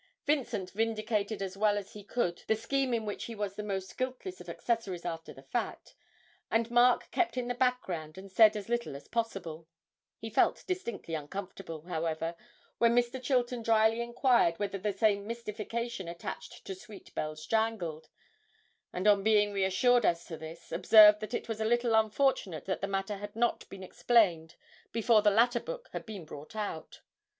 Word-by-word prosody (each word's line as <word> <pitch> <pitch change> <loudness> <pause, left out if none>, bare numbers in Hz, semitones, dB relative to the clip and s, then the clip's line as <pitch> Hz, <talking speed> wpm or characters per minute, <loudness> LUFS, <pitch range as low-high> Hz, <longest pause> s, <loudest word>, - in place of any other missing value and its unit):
Vincent 240 -10 0
vindicated 215 -1 -1
as 190 -1 -5
well 205 0 +2
as 200 -1 -6
he 210 - -9
could 185 -5 -1
the 220 - +3
scheme 260 +4 -1
in 230 -2 0
which 205 - -4
he 230 - -7
was 205 -2 -3
the 210 - -5
most 195 -2 -4
guiltless 260 +9 -4
of - - -10
accessories 205 -7 -2
after 165 -1 -5
the - - -13
fact, - - -4 0.6
and 230 +1 +1
Mark 240 +1 +4
kept 345 -7 0
in 245 -1 -1
the 245 - -1
background 190 -11 -1
and 195 0 -10
said 215 +2 +6
as 205 - -6
little 235 -10 -2
as 140 - -10
possible; 185 -9 -3 0.5
he - - -7
felt - - +2
distinctly 235 - -4
uncomfortable, 165 +1 -6
however, 165 -1 -2 0.4
when 235 0 +4
Mr. 245 +1 +1
Chilton 250 -2 0
drily 225 0 +3
inquired 235 -7 +3
whether 200 -1 -3
the 210 +2 -1
same 200 0 +1
mystification 230 -2 -4
attached 170 0 -7
to 195 - -4
'Sweet 195 +2 -13
Bells 155 0 -4
Jangled,' 210 -9 -1 0.8
and 180 +2 -4
on 205 -1 +6
being 210 0 +3
reassured 200 +6 +3
as 170 -3 +1
to 165 - -6
this, 160 +1 -10
observed 210 +4 +8
that 215 +3 -4
it - - -4
was 220 -1 -4
a - - +2
little 240 +1 +2
unfortunate 220 - +1
that 190 - -2
the 195 - -1
matter 195 +1 -2
had 205 +1 -8
not 240 +1 0
been 195 -1 -9
explained 180 -6 +2 0.4
before 230 -1 +4
the 210 - +5
latter 235 +4 +3
book - - -7
had - - -5
been 200 -6 -7
brought 150 +6 -10
out. 205 -7 -5
210 Hz, 175 wpm, -31 LUFS, 185-235 Hz, 0.8 s, observed